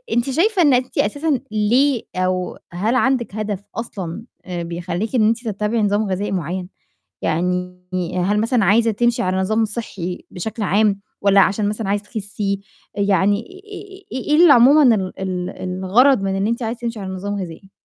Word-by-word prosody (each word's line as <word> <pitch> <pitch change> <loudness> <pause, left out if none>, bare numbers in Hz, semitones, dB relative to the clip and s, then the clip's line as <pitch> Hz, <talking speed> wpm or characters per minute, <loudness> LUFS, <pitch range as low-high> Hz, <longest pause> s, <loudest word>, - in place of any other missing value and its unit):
أنتِ 240 +3 +1
شايفة 365 +8 +2
إن 290 -5 +5
أنتِ 250 0 0
أساسَا، 285 +5 +1
ليه 235 +5 +2
أو 185 0 -1 0.2
هل 210 +8 0
عندِك 255 -5 +1
هدف 210 -3 -3
أصلًا 200 -3 -5 0.2
بيخلّيكِ 175 +5 -4
إن 215 -3 +4
أنتِ 230 +2 -1
تتّبعي 210 +2 -1
نظام 205 +1 +2
غذائي 190 +2 -2
معيّن؟ 180 0 -3 0.5
يعني 180 +2 -1 0.5
هل 205 +2 +1
مثلًا 230 -1 +2
عايزة 225 +4 +4
تمشي 240 +2 +1
على 185 0 0
نظام 215 +4 +1
صحّي 200 -5 -5
بشكل 215 +5 -4
عام، 205 +1 +2 0.2
والَّا 200 0 +5
عشان 205 +2 +1
مثلًا 210 -1 -3
عايزة 205 +1 0
تخسّي؟ 205 -2 -4 0.3
يعني 200 0 +2
آآ 390 - -12
إيه 300 +3 0
اللي 340 -5 +8
عمومًا 255 0 +6
ال 190 -2 -3
ال 185 -2 -3 0.3
الغرض 250 +6 +4
من 195 0 -1
إن 195 +1 0
أنتِ 235 +2 -1
عايزة 230 +2 -3
تمشي 235 -2 -4
على 190 -2 -5
نظام 200 +2 -4
غذائي؟ 190 0 -7
210 Hz, 165 wpm, -20 LUFS, 190-235 Hz, 0.5 s, اللي